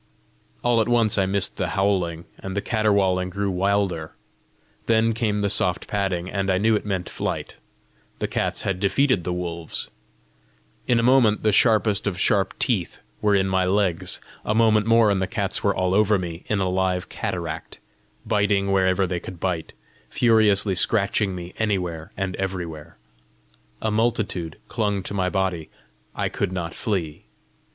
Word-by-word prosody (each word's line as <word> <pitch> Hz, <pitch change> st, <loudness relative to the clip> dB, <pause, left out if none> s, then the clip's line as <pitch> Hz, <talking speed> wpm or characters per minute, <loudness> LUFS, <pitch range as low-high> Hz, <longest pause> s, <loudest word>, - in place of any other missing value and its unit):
All 120 Hz, -2 st, +3 dB
at 110 Hz, -, 0 dB
once 115 Hz, -4 st, +3 dB
I 95 Hz, -, +2 dB
missed 100 Hz, 0 st, +1 dB
the -, -, -1 dB
howling, 90 Hz, -4 st, 0 dB
and 95 Hz, +1 st, -6 dB
the -, -, +1 dB
caterwauling 100 Hz, -5 st, +1 dB
grew 100 Hz, +1 st, -2 dB
wilder. 95 Hz, -4 st, 0 dB, 0.7 s
Then 115 Hz, 0 st, +3 dB
came 110 Hz, -2 st, -1 dB
the 100 Hz, -, +1 dB
soft 90 Hz, -2 st, 0 dB
padding, 95 Hz, -4 st, -1 dB
and 95 Hz, 0 st, -2 dB
I 95 Hz, -, +3 dB
knew 110 Hz, +3 st, +3 dB
it 105 Hz, -, -3 dB
meant 95 Hz, -3 st, -2 dB
flight: -, -, -4 dB, 0.6 s
the -, -, -2 dB
cats -, -, -2 dB
had 95 Hz, -2 st, -1 dB
defeated 105 Hz, +1 st, +2 dB
the 90 Hz, -, -2 dB
wolves! 85 Hz, -2 st, -3 dB, 1.0 s
In 120 Hz, -1 st, +3 dB
a -, -, 0 dB
moment 120 Hz, -4 st, +4 dB
the 110 Hz, -, +3 dB
sharpest 105 Hz, -2 st, +3 dB
of 90 Hz, -3 st, -2 dB
sharp 95 Hz, -3 st, +1 dB
teeth 105 Hz, -10 st, 0 dB, 0.2 s
were 105 Hz, -1 st, +3 dB
in 95 Hz, -1 st, +2 dB
my 95 Hz, -1 st, +1 dB
legs; 95 Hz, -2 st, 0 dB, 0.2 s
a 105 Hz, -, -1 dB
moment 110 Hz, -1 st, +3 dB
more 115 Hz, -2 st, +5 dB
and 95 Hz, -1 st, +1 dB
the 95 Hz, -, 0 dB
cats 100 Hz, -2 st, -2 dB
were 100 Hz, -1 st, +2 dB
all 95 Hz, 0 st, 0 dB
over 105 Hz, +1 st, +4 dB
me 85 Hz, -2 st, -6 dB
in 105 Hz, -, 0 dB
a 95 Hz, -, +1 dB
live 90 Hz, 0 st, 0 dB
cataract, 80 Hz, -3 st, -5 dB, 0.5 s
biting 100 Hz, -2 st, +1 dB
wherever 95 Hz, 0 st, +2 dB
they 90 Hz, -1 st, -2 dB
could 90 Hz, 0 st, -9 dB
bite, 90 Hz, -3 st, -2 dB, 0.4 s
furiously 110 Hz, -4 st, +3 dB
scratching 100 Hz, +1 st, +1 dB
me 90 Hz, 0 st, -8 dB
anywhere 90 Hz, -5 st, -2 dB
and 95 Hz, -2 st, -2 dB
everywhere. 85 Hz, -5 st, -5 dB, 0.9 s
A 110 Hz, -, +1 dB
multitude 105 Hz, -7 st, -1 dB
clung 105 Hz, -4 st, -1 dB
to 100 Hz, -, -4 dB
my 95 Hz, -2 st, 0 dB
body; 95 Hz, -4 st, -1 dB, 0.5 s
I -, -, -1 dB
could -, -, -2 dB
not 85 Hz, -3 st, -4 dB
flee. 85 Hz, -8 st, -3 dB
95 Hz, 165 wpm, -23 LUFS, 90-105 Hz, 1.0 s, more